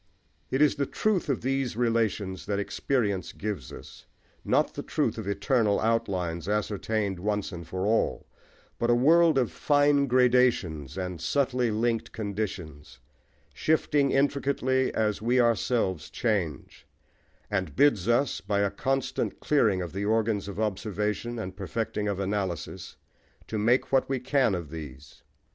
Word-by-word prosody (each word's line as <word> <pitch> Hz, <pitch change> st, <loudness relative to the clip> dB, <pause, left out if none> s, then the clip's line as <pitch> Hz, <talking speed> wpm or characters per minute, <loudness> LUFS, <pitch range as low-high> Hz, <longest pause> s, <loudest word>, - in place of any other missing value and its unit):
It 135 Hz, +3 st, +3 dB
is 150 Hz, -, +3 dB
the 140 Hz, -1 st, 0 dB
truth 210 Hz, -7 st, 0 dB
of 135 Hz, -, 0 dB
these 135 Hz, -2 st, -1 dB
relations 110 Hz, -6 st, 0 dB
that 100 Hz, -1 st, 0 dB
experience 100 Hz, -1 st, -1 dB
gives 100 Hz, -, -5 dB
us, -, -, -12 dB, 0.4 s
not -, -, +1 dB
the -, -, -5 dB
truth -, -, -1 dB
of 105 Hz, -, -6 dB
eternal 105 Hz, 0 st, +1 dB
outlines 90 Hz, -6 st, -1 dB
ascertained 105 Hz, -1 st, -1 dB
once 105 Hz, +1 st, -2 dB
for 95 Hz, +3 st, -3 dB
all, 110 Hz, +2 st, +1 dB, 0.5 s
but 120 Hz, -, 0 dB
a 120 Hz, -, +5 dB
world 160 Hz, +4 st, +5 dB
of 125 Hz, -4 st, +1 dB
fine 145 Hz, -1 st, +3 dB
gradations 120 Hz, -, +2 dB
and 90 Hz, -3 st, -4 dB
subtly 125 Hz, -, +1 dB
linked 115 Hz, +1 st, -1 dB
conditions, 95 Hz, -8 st, -5 dB, 0.6 s
shifting 150 Hz, -3 st, +2 dB
intricately 135 Hz, -1 st, +1 dB
as 105 Hz, -2 st, 0 dB
we 120 Hz, +3 st, +2 dB
ourselves 115 Hz, -7 st, +1 dB
change 100 Hz, -, -2 dB, 0.6 s
and 95 Hz, -3 st, -2 dB
bids 125 Hz, -9 st, +3 dB
us, 120 Hz, +3 st, +1 dB
by 100 Hz, 0 st, 0 dB
a 100 Hz, -1 st, +1 dB
constant 135 Hz, 0 st, -2 dB
clearing 105 Hz, -11 st, +2 dB
of 85 Hz, -, -7 dB
the 100 Hz, +2 st, -2 dB
organs 110 Hz, -2 st, +1 dB
of 100 Hz, +1 st, -6 dB
observation 105 Hz, +2 st, -2 dB
and 95 Hz, -4 st, -5 dB
perfecting 105 Hz, +2 st, -3 dB
of 100 Hz, -2 st, -2 dB
analysis, 95 Hz, -4 st, -3 dB, 0.5 s
to 110 Hz, -, -3 dB
make 120 Hz, +5 st, +2 dB
what 135 Hz, -1 st, +2 dB
we 135 Hz, -1 st, 0 dB
can 130 Hz, -4 st, +2 dB
of 85 Hz, -5 st, -6 dB
these. 75 Hz, -3 st, -10 dB
110 Hz, 140 wpm, -27 LUFS, 95-130 Hz, 0.6 s, a